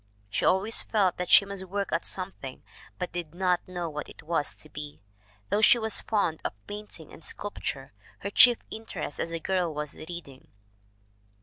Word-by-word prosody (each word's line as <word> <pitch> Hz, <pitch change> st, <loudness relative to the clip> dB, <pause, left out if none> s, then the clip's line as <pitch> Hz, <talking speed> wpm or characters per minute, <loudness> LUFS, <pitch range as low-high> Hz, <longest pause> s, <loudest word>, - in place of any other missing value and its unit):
She -, -, 0 dB
always 200 Hz, +5 st, +5 dB
felt 195 Hz, -5 st, +2 dB
that 180 Hz, -, -3 dB
she 200 Hz, -, +8 dB
must 200 Hz, -1 st, -5 dB
work 200 Hz, +1 st, -2 dB
at 165 Hz, -, 0 dB
something, 180 Hz, -8 st, -5 dB, 0.3 s
but 180 Hz, -1 st, -3 dB
did 170 Hz, -2 st, -5 dB
not 180 Hz, -1 st, +1 dB
know 175 Hz, -2 st, -3 dB
what 150 Hz, -2 st, -5 dB
it -, -, -13 dB
was 160 Hz, -2 st, 0 dB
to -, -, -8 dB
be. 150 Hz, -1 st, -8 dB, 0.5 s
Though 210 Hz, -, +2 dB
she 230 Hz, -, +7 dB
was 220 Hz, -2 st, 0 dB
fond 180 Hz, -7 st, 0 dB
of -, -, -2 dB
painting 205 Hz, -6 st, -8 dB
and -, -, -13 dB
sculpture, 140 Hz, -, -3 dB, 0.3 s
her 200 Hz, -, -3 dB
chief 240 Hz, +2 st, +8 dB
interest 195 Hz, -9 st, -5 dB
as -, -, -1 dB
a 165 Hz, 0 st, -3 dB
girl 180 Hz, 0 st, 0 dB
was 150 Hz, -1 st, -4 dB
reading. 155 Hz, -5 st, -9 dB
180 Hz, 180 wpm, -28 LUFS, 155-200 Hz, 0.5 s, she